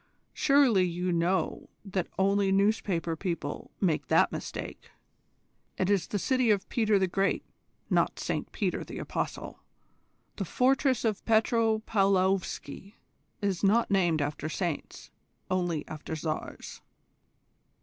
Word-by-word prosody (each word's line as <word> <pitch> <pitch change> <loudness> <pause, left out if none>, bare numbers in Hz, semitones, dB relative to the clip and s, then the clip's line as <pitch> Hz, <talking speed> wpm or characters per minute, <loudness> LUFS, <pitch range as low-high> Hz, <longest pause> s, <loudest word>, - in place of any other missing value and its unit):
Surely 275 -9 +4
you 180 +1 -1
know 175 +2 0 0.2
that 190 -3 -2
only 195 0 +2
newspaper 195 -4 +1
people 165 -4 -4
make 170 -6 0
that - - +4
mistake. - - -6 0.9
It 190 +1 +1
is 195 -3 +1
the 205 - -2
city 255 +3 +1
of 200 -2 +2
Peter 215 -3 +2
the 190 - +2
Great, 195 +2 0 0.4
not - - +1
Saint - - -3
Peter - - -1
the - - -8
apostle. - - -4 0.8
The 195 - -2
fortress 260 - +2
of 215 -3 -1
Petro 225 0 +2
paulovsky 195 -2 0 0.5
is 195 -2 -1
not 215 +3 +3
named 175 -6 +2
after 145 +1 -3
saints 170 -2 -4 0.4
only 175 -4 -1
after 155 +1 -6
Tsars." 155 0 -5
195 Hz, 120 wpm, -29 LUFS, 175-215 Hz, 0.9 s, Surely